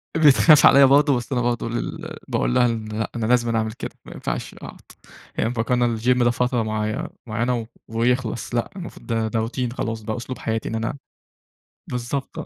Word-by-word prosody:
بتخاف 150 0 +6
عليَّ 140 +1 +8
برضه، 140 +1 +5
بس 120 +4 -7
أنا 125 - +1
برضه 120 -1 -1
ال 120 +1 -4
باقول - - 0
لها 120 - +5
إن 115 -2 -1
لأ، 110 +1 -3
أنا 115 - -1
لازمًا 120 -1 +2
أعمل 110 0 -1
كده، - - -6
ما - - -10
ينفعش - - -4
أقعُد. - - -11 0.5
هي 110 - 0
مفكّرة 120 +1 0
إن 120 -2 +1
الGym 125 +2 +2
ده 120 - +4
فترة 125 0 0
معي 110 0 -2 0.2
معيّنة 115 +1 -1 0.2
ويخلص، 120 +1 -1
لأ 120 - 0
المفروض 180 -3 -9
ده 115 -1 0
ده 110 0 -1
Routine 125 0 -3
خلاص 115 -3 -3
بقى 110 +2 -4
أسلوب 125 +2 -6
حياتي 110 0 -2
إن - - -3
أنا 115 +5 -2 0.9
بالضبط 125 +3 -4
آه. - - -5
120 Hz, 195 wpm, -22 LUFS, 115-125 Hz, 0.9 s, عليَّ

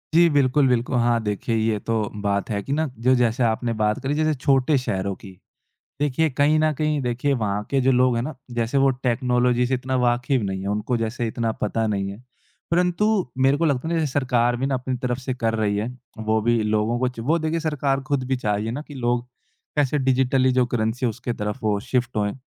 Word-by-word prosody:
जी 170 0 +6
बिल्कुल, 140 -1 +3
बिल्कुल। 125 0 +1
हाँ, 120 0 +2
देखिए 105 +2 -2
ये 110 -1 +1
तो 110 -1 -1
बात 100 -1 -1
है 100 -2 -1
कि 135 - -3
ना 160 +2 0
जो 125 +3 +3
जैसे 120 0 +1
आपने 115 +1 0
बात 105 0 +1
करी 135 +2 0
जैसे 155 +1 +1
छोटे 135 +2 +2
शहरों 100 -6 -2
की। 100 - -12 0.7
देखिए 145 +2 +1
कहीं 145 +3 +3
न 155 0 +2
कहीं 150 -1 +1
देखिए 125 +3 0
वहाँ 105 -4 -1
के 135 -1 +2
जो 130 +1 +3
लोग 125 -1 +3
है 115 - 0
ना 145 +4 -5 0.2
जैसे 120 +3 0
वो 135 0 +4 0.2
टेक्नोलॉजी 125 0 +2
से 130 - 0
इतना 130 +1 -2
वाकिफ़ 120 +1 +1
नहीं 95 -1 -3
है - - -5
उनको 105 +4 -1
जैसे 115 +2 -2
इतना 115 0 -1
पता 110 +2 0
नहीं 100 -2 -1
है। 100 - -9 0.5
परंतु 180 +4 +2 0.3
मेरे 135 +2 +4
को 165 - 0
लगता 145 -1 0
है 170 - 0
ना 160 - +1
सरकार 125 -3 +1
भी 130 - -1
ना 135 - 0
अपनी 130 0 -2
तरफ 125 0 -1
से 130 -1 -4
कर 115 -2 -1
रही 105 -2 0
है। 105 +3 -1 0.3
वो 110 0 +1
भी 120 -1 +2
लोगों 110 +2 0
को 130 - +2
च 125 -2 -8
वो 155 +8 +2
देखिए 160 +1 -1
सरकार 145 -3 0
ख़ुद 140 -3 0
भी 130 - +1
चाह 105 -4 -1
रही 105 +2 -2
है 115 - -2
ना 145 +5 -4
कि 145 - -9
लोग 120 -2 0 0.5
कैसे 145 0 +2
डिजिटली 130 0 +2
जो 125 0 +3
करेंसी 120 +1 -1
है - - +1
उसके 120 +2 -4
तरफ 105 -2 -4
वो 105 -2 +1
शिफ्ट 125 0 -2
होएँ। 105 -1 0
125 Hz, 230 wpm, -23 LUFS, 110-135 Hz, 0.7 s, जी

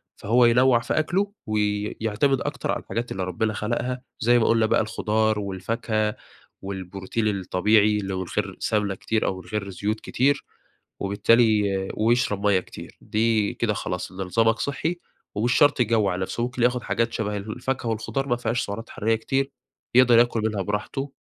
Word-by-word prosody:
فهو 120 +3 +3
ينوع 120 +1 +5
في 120 +6 -1
أكله 195 +6 0 0.2
ويعتمد 105 +4 0
أكتر 145 -1 -2
على - - -1
الحاجات 120 +1 -4
اللي 95 - -2
ربنا 110 +4 -1
خلقها، 120 +4 -2 0.2
زي 120 +2 +4
ما 110 - +2
قولنا 115 -1 +3
بقى، 110 - +3
الخضار 110 0 0
والفاكهة 105 +2 -2 0.5
والبروتين 95 +3 -3
الطبيعي، 105 +2 +2
اللي 95 -2 -3
هو 95 - -2
من - - -4
غير - - -1
سمنة 105 -3 0
كتير 110 +3 -1
أو 95 -1 -2
من 90 - -17
غير 100 0 -3
زيوت 105 +4 -2
كتير، 140 +3 0 0.5
وبالتالي 105 +2 +3 0.3
ويشرب 110 -3 +1
مَيَّة 95 -2 +4
كتير، - - -12
دي 110 -1 +1
كده 110 -3 0
خلاص 90 -2 -4
إن - - -13
نظامك 110 +4 +1
صحّي 160 +5 -2 0.3
ومش 115 +4 +1
شرط 145 -3 +4
يجوّع 105 -5 +2
نفسه. 95 +5 -3
ممكن 125 0 -2
ياخد 125 0 +2
حاجات 115 0 -1
شبه 105 -1 -2
الفاكهة 120 +5 -3
والخضار، 135 +5 -2
ما 120 - +2
فيهاش 120 +1 -1
سعرات 110 +3 -6
حراريّة 110 +2 0
كتير، 135 +4 -1 0.4
يقدر 125 -2 +6
ياكل 120 -1 +3
منها 105 -3 0
براحته. 120 +8 -3
110 Hz, 165 wpm, -24 LUFS, 105-120 Hz, 0.5 s, يقدر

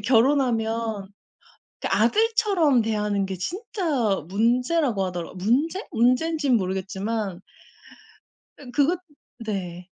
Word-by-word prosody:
결혼하면 230 -4 +1 0.7
그 - - -2
아들처럼 380 - +3
대하는 210 -2 0
게 190 0 -4
진짜 295 - -1
문제라고 240 - +1
하더라고요. 175 -2 -5
문제? 280 - 0
문젠진 255 +3 +2
모르겠지만. 190 +1 -3 1.2
음 255 -4 -11
그거 295 +7 +3 0.5
네. 180 -4 -4
230 Hz, 230 characters per minute, -24 LUFS, 195-290 Hz, 1.2 s, 아들처럼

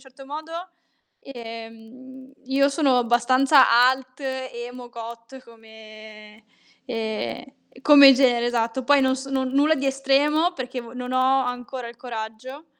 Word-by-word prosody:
certo 265 0 -16
modo, 310 +3 -8 0.7
ehm, 240 +2 -12
io 275 +2 +2
sono 275 -3 +1
abbastanza 255 +4 +3 0.2
alt, 260 +1 -4
emo, 250 -2 -7
goth 235 +2 -11
come 220 -1 -16 0.4
ehm, 220 - -4 0.4
come 280 -2 +8
genere, 245 -3 +2
esatto. 240 +1 -2
Poi 285 +1 +4
non 260 0 +1
sono, 270 0 -3
nulla 280 +4 +2
di 275 -2 -3
estremo 285 +5 +1
perché 255 -3 -6
vo 230 -1 -12
non 250 0 -6
ho 260 +1 +2
ancora 245 0 -6
il 235 - -13
coraggio 240 +5 -8
255 Hz, 125 wpm, -23 LUFS, 235-270 Hz, 0.7 s, come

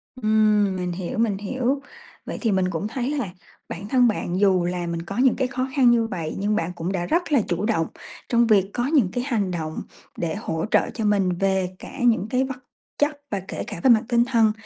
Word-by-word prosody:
Ừm, 215 -4 +3
mình 180 -1 -2
hiểu, 185 +7 -4
mình 220 -4 +1
hiểu. 260 +6 -1 0.4
Vậy - - -5
thì 225 -4 +1
mình 190 -1 +1
cũng 185 +4 -3
thấy 245 +3 -3
là 240 -8 -1 0.4
bản 195 +4 -6
thân 250 +1 +4
bạn 190 -4 -1
dù 185 -3 +3
là 175 -1 -2
mình 170 0 -3
có 195 +5 -7
những 260 -1 +4
cái 260 - 0
khó 255 0 -2
khăn 255 -4 +6
như 230 -1 +2
vậy, 165 -7 -4
nhưng 210 +1 +1
bạn 165 -1 -1
cũng 170 +2 -3
đã 175 -3 -2
rất 340 - 0
là 275 - +4
chủ 180 +4 -1
động 185 -8 +1 0.4
trong 235 -1 +3
việc 200 -3 +4
có 240 - -1
những 275 - +3
cái 245 - -2
hành 205 -8 0
động 160 -2 -4 0.4
để 165 -2 -2
hỗ 165 -6 -3
trợ - - +3
cho 225 - -3
mình 200 -3 +2
về 190 -2 +1
cả - - -10
những 230 -4 +3
cái 255 +2 +2
vật 270 0 -4 0.4
chất 290 0 +1
và 200 - -1
kể - - -4
cả - - -6
về 260 - +5
mặt 225 -2 +6
tinh 235 0 +3
thần. 230 -4 +3
210 Hz, 235 wpm, -23 LUFS, 185-245 Hz, 0.4 s, khăn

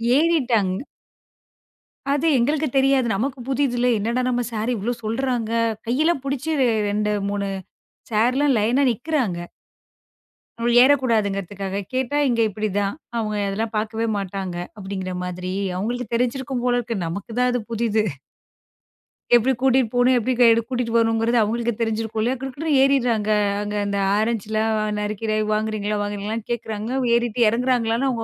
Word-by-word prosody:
ஏறிட்டாங்க 250 - +2 1.3
அது 290 +3 +1
எங்களுக்குத் 290 +3 0
தெரியாது. 270 -2 +3
நமக்குப் 245 +3 -3
புதிதுல. 250 -3 +1
"என்னடா 230 +5 -1
நம்ம 245 -1 0
சாரு, 225 +2 -1
இவ்ளோ 220 +5 -1
சொல்றாங்க!" 235 0 -1 0.4
கையில 305 +8 +2
புடிச்சி 275 +2 -3 0.4
2 210 +1 0 0.2
3 200 0 -2 0.6
சாருலாம் 255 +6 +2
லைன்னா 240 +7 +2
நிக்குறாங்க. 245 - -1 1.2
அவங்க 235 +1 +1
ஏறக் 280 +1 +5
கூடாதுன்றதுக்காகக் 200 -3 -1
கேட்டா, 260 +3 0
இங்க 235 -2 +1
இப்படி 215 +2 -3
தான், 200 -1 0 0.2
அவங்க 215 -2 -2
அதெல்லாம் 215 +3 -3
பாக்கவே 220 +1 -1
மாட்டாங்க, 190 -2 -4 0.2
அப்படிங்கற 190 -2 -5
மாதிரி, 180 0 -4 0.2
அவங்களுக்கு 240 +5 -3
தெரிஞ்சிருக்கும் 250 +1 -1
போல 245 -1 +2
இருக்கு. 235 -2 -3
நமக்குத் 200 +7 -6
தான் 250 0 +3
அது 245 -1 -1
புதிது. 220 -1 +1 1.3
எப்படி 240 +2 +4
கூட்டிட்டு 260 -3 +3
போணும், 245 +1 +4
எப்படி 255 +3 0
கையோடு 230 -1 +6
கூட்டிட்டு 245 -3 -2
வரணும்ங்கறது 225 +1 +2
அவங்களுக்கு 235 +2 0
தெரிஞ்சிருக்கும்ல. 225 +1 -1
குடு 270 +1 -4
குடுன்னு 305 +4 -2
ஏரிறாங்க. 245 -6 +2 0.3
அங்க 210 0 -4
அந்த 200 0 -1 0.2
ஆரஞ்சுலாம் 220 0 0 0.2
நறுக்கி 210 +1 -3
ஏய் 215 - 0
வாங்குறீங்களா 215 -1 -1
வாங்குறீங்களா, 205 +2 -3
கேக்குறாங்க. 220 -1 -3 0.2
ஏறிட்டு 235 0 0
இறங்குறாங்கலானா, 245 +1 +1
230 Hz, 130 wpm, -22 LUFS, 210-250 Hz, 1.3 s, கையோடு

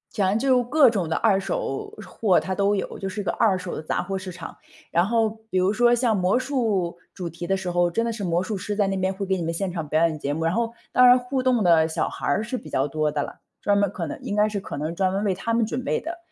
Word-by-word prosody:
反 200 -4 +2
正 215 - +1
就 255 -1 +3
各 270 +1 +5
种 190 -8 -2
的 165 - 0
二 210 -4 +3
手 160 -7 -3 0.2
货 185 0 +2
它 190 - -3
都 200 +1 +2
有， 200 - -3
就 195 - -3
是 200 +2 -4
个 - - -2
二 195 -5 +2
手 180 -1 -5
的 - - -6
杂 155 - -1
货 195 +2 -3
市 185 -1 -6
场。 170 -1 -9 0.3
然 170 +1 +2
后 225 +1 +2 0.2
比 185 - -1
如 185 +2 +2
说 240 +2 +4
像 240 -2 +2
魔 185 +5 +2
术 225 -10 -1 0.2
主 180 -3 -5
题 170 +2 -7
的 195 +2 +1
时 190 -1 -4
候， 175 0 +2
真 230 +6 0
的 230 - -1
是 215 - -6
魔 175 -1 +1
术 200 +2 -3
师 205 +2 -4
在 205 -2 +2
那 195 - -1
边 190 0 0
会 195 +1 -4
给 190 0 +1
你 175 - -3
们 165 +1 -2
现 190 +3 -2
场 165 -3 -3
表 160 +3 +3
演 155 -2 -4
节 145 0 -2
目， 160 +2 -2
然 165 - +1
后 230 0 -1 0.2
当 250 - +6
然 250 0 +8
互 255 +1 -2
动 255 -3 +2
的 165 -2 +5
小 160 - -1
孩 - - -6
儿 145 +9 +2
是 235 +4 -3
比 155 - -10
较 135 0 0
多 155 +1 -1
的 145 -1 -1
了， - - -9 0.2
专 205 -1 +2
门 200 -2 +2
可 175 -5 -4
能 - - -5
应 - - -4
该 210 +1 +4
是 205 -2 -3
可 145 - -7
能 155 +3 -3
专 185 +1 +1
门 195 +1 -1
为 195 - +2
他 230 +5 -3
们 230 -1 +2
准 245 +3 -4
备 - - 0
的， 335 +2 -6
195 Hz, 320 characters per minute, -24 LUFS, 175-225 Hz, 0.3 s, 然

